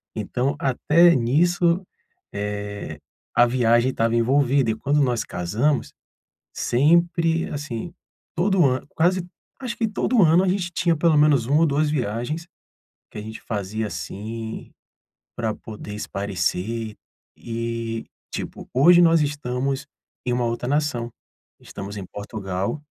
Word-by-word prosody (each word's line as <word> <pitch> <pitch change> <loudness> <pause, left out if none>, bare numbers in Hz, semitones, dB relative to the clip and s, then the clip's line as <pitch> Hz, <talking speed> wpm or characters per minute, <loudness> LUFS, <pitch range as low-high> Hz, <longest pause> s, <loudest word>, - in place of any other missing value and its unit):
Então, 125 +6 -1
até 165 +6 +4
nisso, 170 +8 +2 0.5
eh, 100 -5 -5 0.4
a 120 - +7
viagem 120 0 +3
estava 115 -1 0
envolvida, 130 +1 +3
e - - -2
quando 145 +5 +1
nós 120 -3 0
casamos, 110 - -1 0.6
sempre, 165 +4 +2
assim, 145 +2 -5 0.4
todo 185 +1 +3
ano 130 -1 +1
quase 175 +2 +1 0.3
acho 245 -3 -4
que 225 - +1
todo 220 +2 +1
ano 170 +3 +5
a - - 0
gente 180 -1 0
tinha 170 -1 +1
pelo 155 0 +3
menos 145 -5 +4
1 145 +4 +3
ou 165 - +6
2 150 +1 +1
viagens, 135 +4 -2 0.6
que - - -13
a - - -5
gente 110 +1 -8
fazia, 105 0 -3
assim, 110 +2 -6 0.7
pra 110 -3 -2
poder 105 -2 -9
espairecer. 100 +2 -2 0.4
E, 115 -1 -4 0.3
tipo, - - -6
hoje 170 +7 +7
nós 165 -1 +5
estamos 135 -2 -2 0.4
em 125 - 0
uma 125 0 0
outra 120 +1 -2
nação, 140 -4 0 0.5
estamos 100 +1 -8
em 100 - -6
Portugal 100 - -4
125 Hz, 130 wpm, -23 LUFS, 110-160 Hz, 0.7 s, a